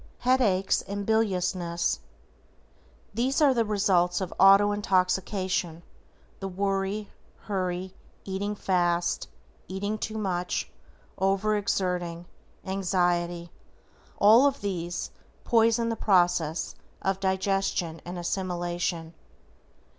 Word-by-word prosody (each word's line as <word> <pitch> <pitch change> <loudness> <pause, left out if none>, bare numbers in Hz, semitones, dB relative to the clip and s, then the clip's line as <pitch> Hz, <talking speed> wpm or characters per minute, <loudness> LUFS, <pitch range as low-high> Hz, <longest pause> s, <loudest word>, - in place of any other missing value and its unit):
=HEADACHES 225 -7 +2
AND 200 0 -4
BILIOUSNESS:= 180 -5 0 1.1
These 255 +7 0
are 290 -3 +5
the 235 -2 +2
results 190 -4 +2
of 190 -2 -4
AUTO 195 +1 +7
INTOXICATION, 185 -3 0 0.6
the 195 - -4
worry, 195 +2 -2 0.3
hurry, 185 -2 -3 0.3
eating 200 +2 -3
fast, 175 -3 0 0.4
eating 205 +3 -3
too 220 0 -4
much, 180 -4 -2 0.5
over 195 +2 +2
exerting, 180 -4 -1 0.4
anxiety, 175 -3 0 0.7
all 225 +7 +7
of 280 -1 -2
these 175 -3 -3 0.3
poison 230 0 +3
the 230 - -1
process 175 -6 +1 0.3
of 195 0 0
digestion 190 -3 -1
and 175 +1 -6
assimilation. 175 -2 -2
190 Hz, 95 wpm, -27 LUFS, 175-205 Hz, 1.1 s, AUTO